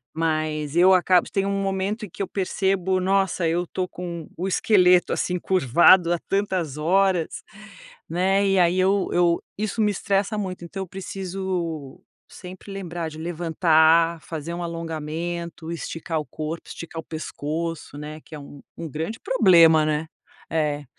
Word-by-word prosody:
Mas 155 Hz, -2 st, -1 dB
eu 185 Hz, +2 st, +6 dB
acabo, 180 Hz, 0 st, +4 dB
tem 195 Hz, -, 0 dB
um 200 Hz, 0 st, -1 dB
momento 195 Hz, +3 st, -2 dB
em -, -, -13 dB
que 200 Hz, -, -8 dB
eu 195 Hz, -, -1 dB
percebo: 190 Hz, -1 st, 0 dB
"Nossa, 190 Hz, -2 st, +1 dB
eu 170 Hz, +2 st, +1 dB
estou 180 Hz, +1 st, -3 dB
com 170 Hz, -3 st, -7 dB
o 185 Hz, -, -2 dB
esqueleto 180 Hz, -2 st, +4 dB
assim 180 Hz, 0 st, -1 dB
curvado 175 Hz, +2 st, +4 dB
há 170 Hz, -, -1 dB
tantas 185 Hz, -7 st, -1 dB
horas.", 180 Hz, +1 st, +1 dB, 0.6 s
né. 190 Hz, +4 st, +1 dB
E 195 Hz, -1 st, +3 dB
aí, 175 Hz, +1 st, +3 dB
eu 195 Hz, +1 st, +2 dB
eu 175 Hz, -1 st, +2 dB
isso 215 Hz, +1 st, -2 dB
me 210 Hz, -, +3 dB
estressa 200 Hz, +2 st, -1 dB
muito, 185 Hz, -3 st, -4 dB
então 195 Hz, +3 st, -5 dB
eu 190 Hz, -, -10 dB
preciso 185 Hz, -6 st, -5 dB, 0.3 s
sempre 185 Hz, +1 st, -11 dB
lembrar 175 Hz, -4 st, -5 dB
de 155 Hz, -, -11 dB
levantar, 165 Hz, 0 st, +3 dB
fazer 160 Hz, +1 st, -6 dB
um 175 Hz, -, -4 dB
alongamento, 165 Hz, 0 st, -5 dB
esticar 165 Hz, -1 st, -4 dB
o 150 Hz, -, -5 dB
corpo, 155 Hz, +2 st, -6 dB
esticar 165 Hz, -1 st, -8 dB
o -, -, -22 dB
pescoço, 160 Hz, 0 st, -5 dB
né. 150 Hz, +1 st, -8 dB
Que 155 Hz, -, -11 dB
é -, -, -8 dB
um 140 Hz, 0 st, -12 dB, 0.3 s
grande 165 Hz, -, -4 dB
problema, 170 Hz, -10 st, +5 dB
né. 155 Hz, +1 st, 0 dB, 0.4 s
É. 150 Hz, -2 st, -1 dB
175 Hz, 155 wpm, -24 LUFS, 160-190 Hz, 0.6 s, eu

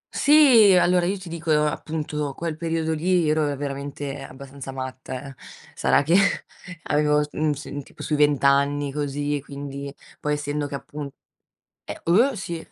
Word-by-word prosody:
Sì. 260 Hz, -10 st, +7 dB
Allora, 180 Hz, 0 st, +3 dB
io 195 Hz, +2 st, -1 dB
ti 185 Hz, -, -11 dB
dico, 165 Hz, 0 st, -6 dB, 0.2 s
appunto 150 Hz, -1 st, -3 dB
quel 165 Hz, -2 st, -3 dB
periodo 160 Hz, 0 st, -1 dB
lì 175 Hz, +1 st, +1 dB
ero 150 Hz, -1 st, +1 dB
veramente 140 Hz, 0 st, -5 dB
abbastanza 135 Hz, 0 st, -9 dB
matta, 130 Hz, 0 st, -6 dB
eh. 135 Hz, -, -12 dB, 0.4 s
Sarà -, -, +2 dB
che 160 Hz, +4 st, +1 dB, 0.7 s
avevo 150 Hz, 0 st, +2 dB
s 150 Hz, -, -8 dB
n 155 Hz, 0 st, +1 dB
s 145 Hz, 0 st, -7 dB
tipo -, -, -12 dB
sui 155 Hz, -, -1 dB
vent'anni 145 Hz, -1 st, +2 dB
così, 145 Hz, 0 st, -2 dB
quindi 140 Hz, 0 st, -7 dB, 0.3 s
poi 150 Hz, -, -1 dB
essendo 145 Hz, 0 st, -2 dB
che 140 Hz, -, -5 dB
appun 145 Hz, +1 st, -7 dB, 0.8 s
eh, -, -, -7 dB
oh, 230 Hz, +11 st, +4 dB
sì, 170 Hz, -3 st, -5 dB
150 Hz, 150 wpm, -24 LUFS, 140-165 Hz, 0.8 s, Sì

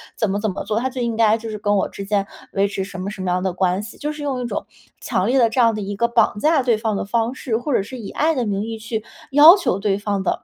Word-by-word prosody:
怎 220 Hz, -, 0 dB
么 200 Hz, +1 st, -1 dB
怎 215 Hz, -1 st, -1 dB
么 190 Hz, -, -5 dB
做， 215 Hz, +1 st, -1 dB
他 260 Hz, +2 st, -1 dB
就 255 Hz, -1 st, -4 dB
应 235 Hz, -1 st, -1 dB
该 220 Hz, -1 st, +4 dB
就 225 Hz, 0 st, -7 dB
是 215 Hz, -, -5 dB
跟 205 Hz, 0 st, 0 dB
我 195 Hz, -, 0 dB
之 200 Hz, -, -7 dB
间 200 Hz, -1 st, 0 dB, 0.2 s
维 200 Hz, 0 st, +1 dB
持 195 Hz, -1 st, -3 dB
什 190 Hz, -1 st, -7 dB
么 190 Hz, -, -3 dB
什 200 Hz, -2 st, -7 dB
么 185 Hz, -1 st, -1 dB
样 180 Hz, +1 st, 0 dB
的 190 Hz, 0 st, 0 dB
关 185 Hz, +1 st, 0 dB
系， 215 Hz, +2 st, -10 dB
就 300 Hz, +1 st, -3 dB
是 300 Hz, -, -9 dB
用 275 Hz, -3 st, -2 dB
一 -, -, -3 dB
种 235 Hz, -, -4 dB, 0.4 s
强 185 Hz, -, 0 dB
烈 260 Hz, +3 st, +3 dB
的 230 Hz, -2 st, +4 dB
这 235 Hz, -, -2 dB
样 230 Hz, -2 st, +5 dB
的 215 Hz, -, -4 dB
一 200 Hz, 0 st, -4 dB
个 235 Hz, +3 st, +1 dB
绑 235 Hz, -3 st, +2 dB
架 310 Hz, +3 st, +3 dB
对 240 Hz, -3 st, +2 dB
方 220 Hz, -1 st, -1 dB
的 -, -, -2 dB
方 230 Hz, +3 st, 0 dB
式， 245 Hz, -4 st, -2 dB
或 270 Hz, +4 st, -3 dB
者 -, -, +3 dB
是 255 Hz, +6 st, -8 dB
以 220 Hz, -5 st, -7 dB
爱 315 Hz, +2 st, +1 dB
的 250 Hz, -3 st, 0 dB
名 200 Hz, -2 st, -1 dB
义 225 Hz, 0 st, -5 dB
去 220 Hz, 0 st, -4 dB, 0.3 s
要 305 Hz, +7 st, +9 dB
求 340 Hz, -, -1 dB
对 195 Hz, -1 st, 0 dB
方 205 Hz, -1 st, -2 dB
的 190 Hz, -, -2 dB
220 Hz, 340 characters per minute, -21 LUFS, 200-245 Hz, 0.4 s, 要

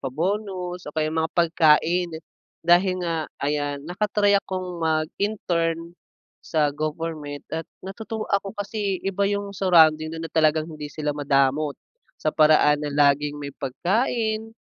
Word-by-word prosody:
pa-bonus, 180 Hz, +3 st, -3 dB
o -, -, -8 dB
kaya 155 Hz, 0 st, 0 dB
mga 160 Hz, 0 st, 0 dB
pagkain, 170 Hz, +1 st, +3 dB, 0.5 s
dahil 185 Hz, +2 st, +4 dB
nga 165 Hz, -2 st, -2 dB, 0.2 s
ayan, 145 Hz, -1 st, -2 dB
naka-try 205 Hz, +3 st, +1 dB
akong 185 Hz, -3 st, -5 dB
mag-intern, 165 Hz, 0 st, -1 dB, 0.5 s
sa 150 Hz, -2 st, 0 dB
government, 155 Hz, -1 st, -4 dB
at 160 Hz, 0 st, -4 dB, 0.2 s
natutuwa 220 Hz, +3 st, -5 dB
ako 200 Hz, +1 st, -1 dB
kasi, 205 Hz, -1 st, -2 dB
iba 195 Hz, +1 st, 0 dB
yung 200 Hz, 0 st, -2 dB
surrounding 160 Hz, -5 st, +4 dB
do'n 165 Hz, 0 st, -5 dB
na 165 Hz, -, -8 dB
talagang 155 Hz, -1 st, +3 dB
hindi 150 Hz, -2 st, -7 dB
sila 150 Hz, 0 st, -3 dB
madamot, 140 Hz, 0 st, +1 dB, 0.4 s
sa 155 Hz, -, -1 dB
paraan 150 Hz, -1 st, +5 dB
na 150 Hz, -, -3 dB
laging 145 Hz, 0 st, +3 dB
may 140 Hz, -1 st, -6 dB
pagkain, 220 Hz, -, -1 dB
165 Hz, 130 wpm, -24 LUFS, 150-195 Hz, 0.5 s, paraan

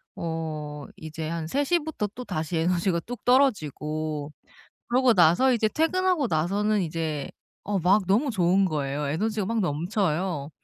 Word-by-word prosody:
어 155 Hz, -3 st, -4 dB
이제 155 Hz, 0 st, -6 dB
한 165 Hz, -1 st, -3 dB
3 280 Hz, -, 0 dB
시부터 305 Hz, -8 st, -1 dB
또 250 Hz, -, -6 dB
다시 165 Hz, -3 st, -3 dB
에너지가 170 Hz, +1 st, +1 dB
뚝 245 Hz, +5 st, -8 dB
떨어지고 155 Hz, -, +1 dB, 0.6 s
그러고 250 Hz, 0 st, +4 dB
나서 180 Hz, +8 st, +5 dB
이제 225 Hz, -2 st, +2 dB
퇴근하고 335 Hz, +1 st, +1 dB
나서는 200 Hz, +5 st, +1 dB
이제 155 Hz, -3 st, -3 dB, 0.3 s
어 200 Hz, -1 st, -1 dB
막 190 Hz, +4 st, +3 dB
너무 225 Hz, +9 st, +2 dB
좋은 190 Hz, -1 st, +3 dB
거예요. 145 Hz, -3 st, -2 dB
에너지가 210 Hz, +7 st, -1 dB
막 230 Hz, +1 st, 0 dB
넘쳐요. 175 Hz, -2 st, -1 dB
180 Hz, 295 characters per minute, -26 LUFS, 155-225 Hz, 0.6 s, 나서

